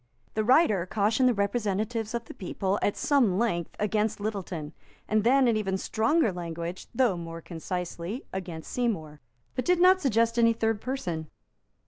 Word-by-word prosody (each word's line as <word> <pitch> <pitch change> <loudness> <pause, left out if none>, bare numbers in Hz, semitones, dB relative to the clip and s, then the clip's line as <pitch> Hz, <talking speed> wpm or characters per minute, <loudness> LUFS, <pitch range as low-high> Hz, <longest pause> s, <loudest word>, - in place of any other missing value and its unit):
The 215 - 0
writer 215 - +4
cautioned 220 +6 +2
the - - +3
representatives 215 +2 -1
of 235 -1 -3
the - - -10
people, 195 +1 -2
at 205 - 0
some 250 -11 +3
length, 175 -7 -1
against 210 +1 0
Littleton; 185 -7 -4 0.3
and 215 0 +2
then, 260 +2 +5
in 230 - +3
even 195 -3 0
stronger 225 - +1
language, 170 0 -5
though 240 -5 +2
more 165 -1 -6
concisely, 180 - -5
against 175 -4 -6
Seymour; 165 -12 -2 0.3
but 255 - -2
did 360 -1 +2
not 370 +1 +6
suggest 230 -3 +2
any 230 0 +5
third 225 -1 0
person. 175 - -3
210 Hz, 155 wpm, -28 LUFS, 180-235 Hz, 0.3 s, not